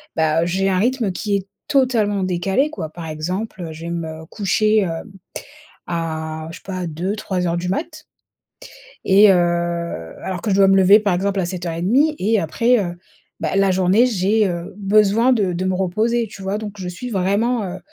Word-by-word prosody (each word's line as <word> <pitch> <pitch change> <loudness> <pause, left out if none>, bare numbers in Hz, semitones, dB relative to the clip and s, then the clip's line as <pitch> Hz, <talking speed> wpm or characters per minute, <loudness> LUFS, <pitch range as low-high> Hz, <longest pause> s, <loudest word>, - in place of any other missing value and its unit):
bah, 160 0 +2
heu, - - 0
j'ai 190 +3 0
un 185 - +1
rythme 235 -1 +1
qui 205 +2 -2
est 195 - -7 0.2
totalement 235 -8 +2
décalé, 190 - 0
quoi. 160 - -6
Par 165 0 -8
exemple, 175 +3 -4
je 160 +1 -9
vais 170 - -4
me 160 -1 -5
coucher, 215 +3 +1
hem, 175 +2 -4 0.8
à 160 -2 -4
je - - -9
sais - - -27
pas 185 -2 -4
2:00-3:00 180 +2 -3
heures 170 0 0
du 180 +1 -3
mat 310 - -4 1.0
et 200 +2 +6
heu - - +4 0.9
alors 185 -2 -4
que 215 - -1
je - - +3
dois 195 0 +5
me 195 0 +5
lever, 195 +3 +7
par 200 -3 0
exemple, 195 +2 0
à 180 - 0
7:30 185 - 0
et 215 +3 +2
après, 230 +9 +2
heu, 175 -1 -5 0.4
bah, - - -2
la 195 -1 +3
journée, 185 +5 +3
j'ai, 210 -1 +2
heu, 175 +2 -5
besoin 210 +4 +3
de 200 -6 0
de 180 +2 -2
me 185 - +1
reposer, 220 +6 0
tu 195 - -11
vois? 195 +2 -2
Donc 210 -2 -6
je 185 - -5
suis 215 +8 -6
vraiment, 210 +4 0
heu 185 0 -6
195 Hz, 190 wpm, -20 LUFS, 175-215 Hz, 1.0 s, lever